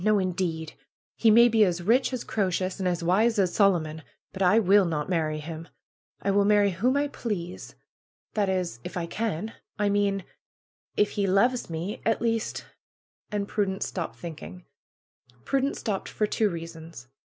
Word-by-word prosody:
No, 215 0 +4
indeed! 175 -4 -2 0.4
He 230 - +3
may 235 +2 +8
be 225 -2 +4
as 175 -3 0
rich 245 +9 +3
as 255 -3 -3
Croesus 185 -2 -1
and 190 - 0
as 175 -1 -1
wise 215 +7 +3
as 190 -3 +2
Solomon; 165 -6 +2 0.3
but 190 - -6
I 190 +3 +5
will 200 -2 +5
not 155 -2 -2
marry 160 -4 0
him! 160 +2 -7 0.6
I 200 - +2
will 200 +1 +4
marry 205 -1 +4
whom 245 +10 +1
I 290 +1 +1
please. 190 -10 -5 0.6
That 205 -3 +1
is, 180 -10 -2
if 185 - -6
I 170 - -1
can; 215 +2 -3 0.2
I 205 0 +1
mean 200 -1 +1 0.7
if 210 - +3
he 200 -2 0
loves 235 +6 +2
me; 165 +5 -4
at 225 - +1
least 230 -1 -1 0.3
" - - -50
And 205 -1 -2
Prudence 195 -2 -1
stopped 170 -4 -4
thinking. 90 - -9 0.8
Prudence 275 +1 0
stopped 200 -3 -2
for 215 - 0
two 210 0 +1
reasons. 165 -6 -8
195 Hz, 170 wpm, -27 LUFS, 170-215 Hz, 0.8 s, may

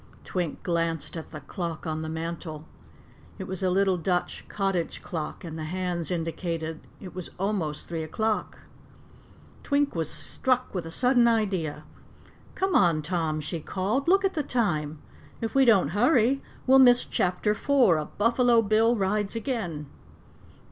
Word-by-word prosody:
Twink 175 -4 -3
glanced 165 -3 -1
at 160 - -7
the 155 - -8
clock 165 +3 -5
on 155 -1 -2
the 160 - -4
mantle. 160 -1 -5 0.7
It - - -5
was 190 +1 -3
a 185 - +2
little 190 0 +2
Dutch 175 +1 -1
cottage 195 -4 -2
clock 160 -4 -5
and 160 -2 -6
the 155 - -4
hands 180 0 -2
indicated 165 -2 -3 0.2
it 185 - -9
was 180 -1 -6
almost 185 -6 -2
three 165 -1 -3
o'clock. 220 +7 -2 1.0
Twink 285 0 +1
was 165 -3 -1
struck 255 -1 0
with 175 -4 -3
a - - -6
sudden 245 +6 +4
idea. 190 -10 0 0.7
"Come 385 -1 0
on, 165 - +3
Tom!" 160 -2 -1
she 165 +2 -4
called. 205 - -2
"Look 390 +2 +4
at 385 - +1
the 310 - 0
time. 160 - -1 0.4
If 225 - -3
we 270 -1 +5
don't 200 - +5
hurry 245 - +3 0.2
we'll 265 +1 +6
miss 245 -1 +6
Chapter 185 +4 0
Four 245 - +3
of 150 - -8
Buffalo 235 +1 +4
Bill 220 +3 +3
Rides 205 +1 -1
Again!" 210 - -3
185 Hz, 155 wpm, -27 LUFS, 165-230 Hz, 1.0 s, we'll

